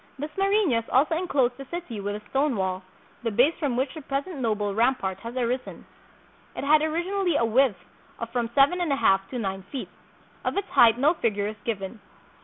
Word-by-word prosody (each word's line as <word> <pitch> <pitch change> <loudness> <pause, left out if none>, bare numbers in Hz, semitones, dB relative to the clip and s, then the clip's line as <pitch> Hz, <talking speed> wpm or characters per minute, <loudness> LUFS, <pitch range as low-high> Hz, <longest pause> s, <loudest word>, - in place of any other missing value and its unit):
Dasmarinas 340 - +1
also 290 +5 +3
inclosed 270 -8 +1
the 275 - -8
city 340 -11 -5
with 205 +1 -3
a 210 0 -10
stone 275 -1 +1
wall, 190 -1 -1 0.4
the 235 - -1
base 250 +9 +3
from 280 -7 -1
which 260 +1 -1
the 315 - -8
present 280 +5 -3
noble 210 -4 0
rampart 220 -4 +1
has 230 +4 -8
arisen. 250 +1 -2 0.7
It - - -4
had 300 +2 +5
originally 345 +3 0
a 235 - +3
width 235 -2 +3 0.4
of 230 0 -6
from 235 -1 -1
seven 285 +6 +4
and 340 -4 0
a - - +3
half 195 -7 +2
to 255 - -5
nine 195 -4 -3
feet. 270 - -5 0.5
Of - - -2
its 400 0 -2
height 230 -1 +6
no 290 +6 +4
figure 210 - -1
is 215 +1 -4
given. 215 -1 -4
255 Hz, 195 wpm, -26 LUFS, 220-300 Hz, 0.7 s, height